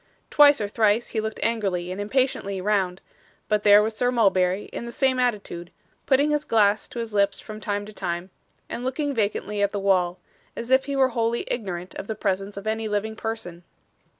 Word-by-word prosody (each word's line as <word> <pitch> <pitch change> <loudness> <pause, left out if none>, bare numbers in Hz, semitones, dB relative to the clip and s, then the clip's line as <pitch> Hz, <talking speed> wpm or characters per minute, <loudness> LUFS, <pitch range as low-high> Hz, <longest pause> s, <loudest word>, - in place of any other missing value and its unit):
Twice 290 -1 +7
or 205 - -1
thrice 215 +2 +2
he 220 - -1
looked 220 0 -4
angrily 195 -6 -1
and 190 +2 -4
impatiently 205 -4 0
round; 190 -2 0 0.5
but 210 -1 +1
there 205 0 +7
was 220 0 -2
Sir 245 +2 +1
Mulberry 195 -4 +2
in - - -5
the - - -6
same 260 0 +1
attitude, 205 -8 -2 0.4
putting 280 +3 +3
his 295 0 +1
glass 210 -4 +2
to - - -11
his 230 -2 -4
lips 200 -1 +2
from 215 -1 -9
time 205 0 -2
to 215 - -11
time, 175 -1 -4 0.4
and 240 - -5
looking 280 +3 -1
vacantly 210 -2 -1
at 200 0 +1
the 205 - -1
wall, 185 -2 +2 0.4
as 235 +2 -6
if 265 0 +4
he 280 0 -3
were 265 -1 +4
wholly 230 -1 0
ignorant 185 -5 -4
of - - -7
the 220 - -3
presence 195 -1 -2
of 200 - -7
any 220 0 -1
living 210 +1 -2
person. 220 -7 -5
210 Hz, 200 wpm, -24 LUFS, 195-235 Hz, 0.5 s, Twice